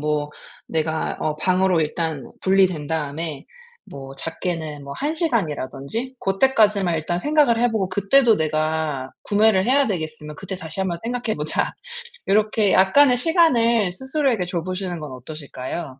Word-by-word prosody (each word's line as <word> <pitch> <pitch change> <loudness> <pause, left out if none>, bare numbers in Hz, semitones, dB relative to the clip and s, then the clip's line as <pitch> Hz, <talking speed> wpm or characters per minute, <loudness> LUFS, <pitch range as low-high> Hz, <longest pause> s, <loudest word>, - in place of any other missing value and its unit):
뭐 150 0 -1 0.4
내가 160 0 -1
어 155 -1 -1
방으로 185 +1 +2
일단 155 -3 -3
분리된 185 -5 +3
다음에 155 0 -3 0.4
뭐 135 -1 -9
작게는 160 -1 -4
뭐 140 - -7
1 295 - -2
시간이라든지 220 - -2
고 195 -2 -2
때까지만 210 -9 +3
일단 165 +3 -2
생각을 290 -1 +3
해 245 +1 +3
보고 200 -4 -1
그때도 225 +4 +3
내가 155 -3 -1
구매를 205 -2 +3
해야 275 +2 +4
되겠으면 155 -5 -5
그때 190 +3 -6
다시 165 0 -7
한번 175 -3 -1
생각해 240 -1 -2
보자. 150 +1 -1 0.6
요렇게 210 0 +2
약간의 250 +7 +5
시간을 235 - +3
스스로에게 265 - 0
줘 175 -1 -3
보시는 185 -2 -4
건 150 -2 -7
어떠실까요? 135 +1 -7
180 Hz, 330 characters per minute, -22 LUFS, 155-220 Hz, 0.6 s, 약간의